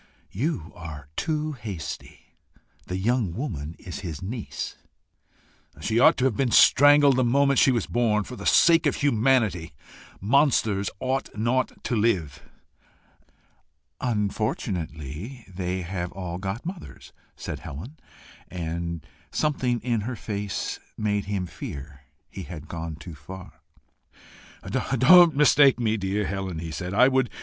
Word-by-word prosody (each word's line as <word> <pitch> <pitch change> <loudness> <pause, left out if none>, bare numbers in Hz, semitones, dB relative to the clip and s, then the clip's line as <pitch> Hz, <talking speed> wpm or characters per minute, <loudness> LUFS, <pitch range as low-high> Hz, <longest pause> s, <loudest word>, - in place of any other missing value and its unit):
"You 105 - -2
are 80 -7 -9
too 155 -1 -1
hasty: 105 - -8 0.5
the 90 - -3
young 105 -3 0
woman 80 - -4
is 90 - -8
his 80 -6 -6
niece." 110 +4 -5 1.0
"She 110 +9 0
ought - - +6
to 130 - +1
have 130 -5 +2
been 130 +2 +1
strangled 145 +2 +6
the 130 - +3
moment 140 +3 +3
she 135 - +5
was 120 -5 0
born 110 -3 +1
for 125 - -9
the - - -5
sake 165 -1 +5
of - - +1
humanity. 110 - +1 0.5
Monsters 110 -4 +2
ought 130 +1 -1
not 120 +4 -1
to 120 - -1
live." 95 - 0 1.6
"Unfortunately 105 - -3
they 90 -1 -3
have 85 0 -4
all 90 -2 -5
got 95 - -4
mothers," 170 - -8 0.2
said - - -6
Helen; 110 - -9 0.5
and 85 -2 -4 0.3
something 130 -5 0
in 115 -1 0
her 120 +4 -4
face 100 -2 -4 0.2
made 105 -1 0
him 100 -2 -2
fear 70 -4 -9 0.2
he 95 - -8
had 85 -4 -8
gone 80 -2 -5
too 85 +2 -10
far. 90 +6 -11 1.1
"Don't 160 +6 +6
mistake 140 -2 +5
me, 110 -2 +1
dear 100 0 -1
Helen," 95 -3 -3
he 80 0 -5
said. 90 +6 -4
105 Hz, 130 wpm, -25 LUFS, 85-130 Hz, 1.6 s, ought